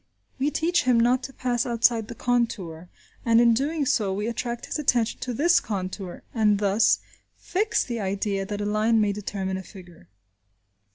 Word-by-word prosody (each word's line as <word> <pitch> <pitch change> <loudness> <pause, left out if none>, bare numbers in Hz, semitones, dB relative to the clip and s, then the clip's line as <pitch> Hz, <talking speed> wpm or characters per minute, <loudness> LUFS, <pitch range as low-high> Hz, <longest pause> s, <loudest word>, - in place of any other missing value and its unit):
We 275 +2 +2
teach 340 +1 +1
him 250 -2 +4
not 245 +2 +3
to 270 - -7
pass 245 -2 -1
outside 230 -2 +2
the - - -8
contour, 195 -9 -2 0.3
and 230 -1 +4
in 235 -1 +5
doing 285 +5 0
so 210 -6 +1
we 205 +2 -2
attract 235 +1 -3
his - - -4
attention 240 -6 +1
to 255 - -4
this 330 +9 +3
contour, 190 -2 -5
and 210 -3 +3
thus 205 +2 +3 0.4
fix 430 +4 0
the 235 -2 -4
idea 195 0 -1
that 205 +1 -4
a - - -2
line 215 +2 +2
may 210 -1 +2
determine 195 -2 -4
a 190 - -7
figure. 175 - -14
225 Hz, 175 wpm, -25 LUFS, 200-245 Hz, 0.4 s, in